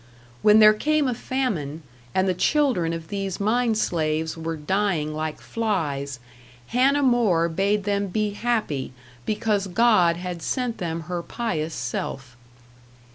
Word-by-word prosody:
When 210 0 +6
there 215 -1 +8
came 300 +5 +1
a 250 - 0
famine, 195 - -3 0.3
and 185 0 +2
the 185 - +2
children 230 - +1
of 165 -1 -6
these 195 -2 -3
mine 225 +2 +1
slaves 160 -5 -1
were 165 0 -4
dying 165 -1 0
like 155 0 -4
flies, 145 - -2 0.5
Hannah 275 +4 +3
More 220 -10 +3
bade 195 +5 0
them 200 0 0
be 210 +2 -1
happy 205 - -2 0.3
because 210 -2 0
God 185 -4 +4
had 180 -1 -5
sent 245 +2 -2
them 165 -2 -3
her 175 +2 -4
pious 170 -7 -3
self. 125 +1 -4
190 Hz, 135 wpm, -24 LUFS, 160-225 Hz, 0.5 s, there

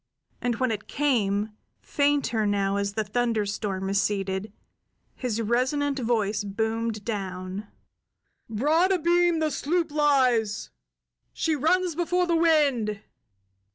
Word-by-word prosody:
And 245 -1 0
when 255 0 0
it 215 -1 -4
came, 215 -7 0 0.3
fainter 280 -7 +1
now 200 -1 +1
as 200 0 -1
the 220 - -1
thunderstorm 210 -3 -1
receded, 195 0 -1 0.6
his 240 -4 -3
resonant 265 +5 0
voice 220 -3 0
boomed 220 +1 -2
down: 190 -2 -4 0.8
"Broad 305 - +2
abeam 345 -1 +3
the 315 -1 0
sloop 325 +3 -1
lies! 255 -8 +2 0.6
She 320 -1 0
runs 350 +5 +2
before 355 +2 +1
the 340 -1 +1
wind!" 285 -11 +2
230 Hz, 110 wpm, -26 LUFS, 205-295 Hz, 0.8 s, abeam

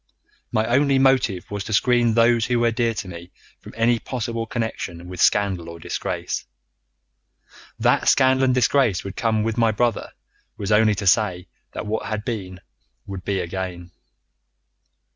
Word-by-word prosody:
My 110 - +1
only 135 +3 +3
motive 130 -9 +2
was 100 -1 -3
to 110 - -4
screen 120 0 +3
those 115 0 +3
who 120 -1 +1
were 120 0 +2
dear 115 0 0
to 95 - -5
me 85 0 -10 0.3
from - - -13
any 115 +1 +2
possible 115 -2 -4
connection 95 -7 -4
with 90 -1 -6
scandal 95 -5 +2
or 85 - -9
disgrace. 80 - -4 1.3
That - - +2
scandal 130 -1 +4
and 130 - +2
disgrace 125 -6 +2
would 100 0 -7
come 110 -2 0
with 115 +1 -2
my 115 -1 +4
brother 115 0 0 0.5
was 100 +1 -3
only 105 0 +4
to 100 +1 -4
say 95 -2 +2 0.2
that - - -5
what 110 +1 -3
had 110 0 -4
been 95 -7 -5 0.4
would 95 -2 -7
be 95 0 -1
again. 90 -1 -5
110 Hz, 160 wpm, -22 LUFS, 95-120 Hz, 1.3 s, scandal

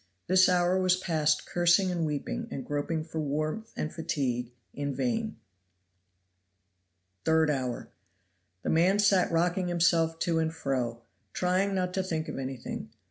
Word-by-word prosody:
This 185 +1 +5
hour 180 +1 +3
was 185 -1 +4
passed 155 -4 +1
cursing 175 +2 +3
and 170 -3 -1
weeping 145 -2 -3
and 130 - -5
groping 145 +2 -2
for 160 0 -5
warmth 155 +9 -2
and 155 - -3
fatigue 125 -7 -2 0.2
in 140 -1 -3
vain. 225 -3 -1 1.9
Third 160 -1 +3
hour. 130 -4 -3 0.7
The - - 0
man 175 +5 +4
sat 200 -4 +3
rocking 175 +2 +1
himself 165 -2 +2
to 165 -2 +1
and 160 0 0
fro, 125 -7 -2 0.3
trying 185 +2 +1
not 180 -1 -1
to 190 - +1
think 160 -4 -3
of - - -5
anything. 130 -4 -5
165 Hz, 140 wpm, -29 LUFS, 145-185 Hz, 1.9 s, This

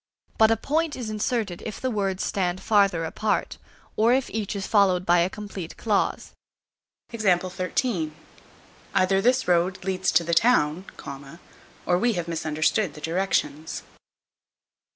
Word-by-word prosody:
But 220 0 +7
a 225 - +3
point 310 +6 -1
is 230 -4 -5
inserted 215 -4 -2
if 215 - -6
the 260 - -1
words 195 -3 -1
stand 185 -2 -1
farther 195 -5 +2
apart, 210 +6 -2 0.4
or 230 +3 +4
if 265 0 0
each 215 -1 -3
is 200 0 -3
followed 190 -4 +3
by 175 0 +4
a 170 +2 +2
complete 195 -4 -8
clause. 210 -3 0 0.8
Either 185 -4 0 1.5
this 250 +4 +2
road 180 +1 +1
leads 190 0 0
to 165 +2 +4
the 170 +1 -1
town, 175 -4 +3 1.0
or 175 0 +2
we 240 +2 +2
have 175 -3 -3
misunderstood 160 +4 0
the 150 - -10
directions. 160 -2 -1
190 Hz, 130 wpm, -25 LUFS, 175-220 Hz, 1.5 s, But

